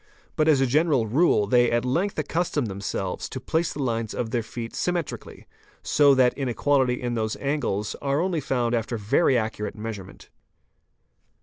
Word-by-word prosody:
But 155 - +2
as 150 -4 +5
a - - +4
general 140 -2 +2
rule 120 -2 +3
they 120 +3 +3
at 120 +1 0
length 175 +11 0
accustom 155 -2 -1
themselves 95 -2 -4
to 130 - -5
place 160 +6 -1
the 145 - -4
lines 115 -3 -2
of 115 -2 -3
their 120 - 0
feet 115 +1 -7
sym 180 - 0
metrically, 170 -4 -6 0.4
so 145 -1 +4
that 125 -1 +4
inequality 130 -1 +1
in 120 -1 -3
those 110 -2 -1
angles 140 -8 -2
are 140 +1 0
only 175 -1 0
found 125 -3 -1
after 115 0 -1
very 125 +6 +2
accurate 110 -2 -3
measurement. 105 -3 -8
125 Hz, 170 wpm, -25 LUFS, 115-145 Hz, 0.4 s, as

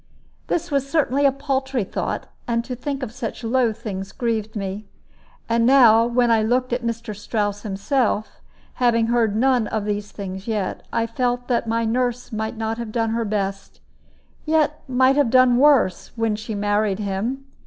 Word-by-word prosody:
This 345 -1 -2
was 275 -1 0
certainly 285 -2 +2
a - - +3
paltry 265 -3 -1
thought; 190 - -3 0.2
and 235 -1 0
to 250 - -4
think 275 +2 -4
of 220 - -4
such 235 0 -6
low 240 0 +2
things 195 -3 -6
grieved 220 -2 -2
me. 200 0 -4 0.6
And 230 0 +2
now, 235 -3 +6
when 240 0 +2
I 225 -1 +4
looked 245 +3 0
at 245 - -1
Mr. 230 -2 -4
Strouss 205 0 -2
himself, 215 +2 -1 0.4
having 230 -2 +3
heard 235 -2 +3
of 205 - -4
none 250 -1 +2
of 215 -2 -2
these 205 0 -2
things 190 0 -7
yet, 210 -4 -2
I 230 - +1
felt 245 +1 -1
that 235 -2 +1
my 230 0 0
nurse 245 +1 -1
might 220 +1 -3
not 225 +1 -2
have 230 -2 -5
done 225 -1 0
her 230 0 -1
best, 195 -2 -3 0.6
yet 305 -1 +1
might 260 +1 +3
have 285 -5 +3
done 255 0 +5
worse, 270 -10 +3
when 225 -2 0
she 215 +1 -5
married 205 -1 +1
him. 215 +7 -3
230 Hz, 175 wpm, -22 LUFS, 215-255 Hz, 0.6 s, now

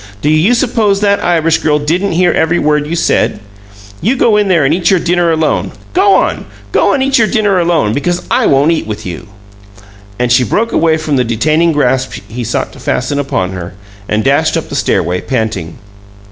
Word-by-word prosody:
Do 150 - +2
you 165 +10 +3
suppose 225 -5 +1
that 200 0 +1
Irish 165 -2 +1
girl 150 -1 +1
didn't 170 +6 -1
hear 175 +1 +2
every 160 +2 +1
word 150 -1 0
you 165 - -3
said? 115 -9 0 0.6
You 235 +8 +1
go 235 -4 +2
in 210 -1 +2
there 170 -6 +2
and 140 - +2
eat 170 0 +1
your 190 - +3
dinner 175 0 +1
alone! 160 -1 -1 0.2
Go 390 +2 +4
on! - - 0 0.3
Go - - +2
and 265 - +1
eat 270 0 +2
your 220 - +3
dinner 205 -5 +1
alone 170 -11 +1
because 175 +7 -2
I - - +2
won't 140 +4 +3
eat 160 -9 -2
with 105 -1 -6
you!" 90 +4 -7 0.9
And 125 -1 -1
she 125 +1 +4
broke 225 - -1
away 160 -1 +2
from 155 -3 -2
the 125 - +2
detaining 155 +9 +1
grasp 130 -3 0
he 120 +2 -6
sought 115 - -3
to 135 - -14
fasten 130 +3 -2
upon 95 -9 -2
her, 90 0 -7 0.3
and 105 +1 0
dashed 140 +1 +1
up - - -5
the - - -5
stairway, 90 +1 0
panting. 110 - -3
155 Hz, 200 wpm, -12 LUFS, 125-180 Hz, 0.9 s, Go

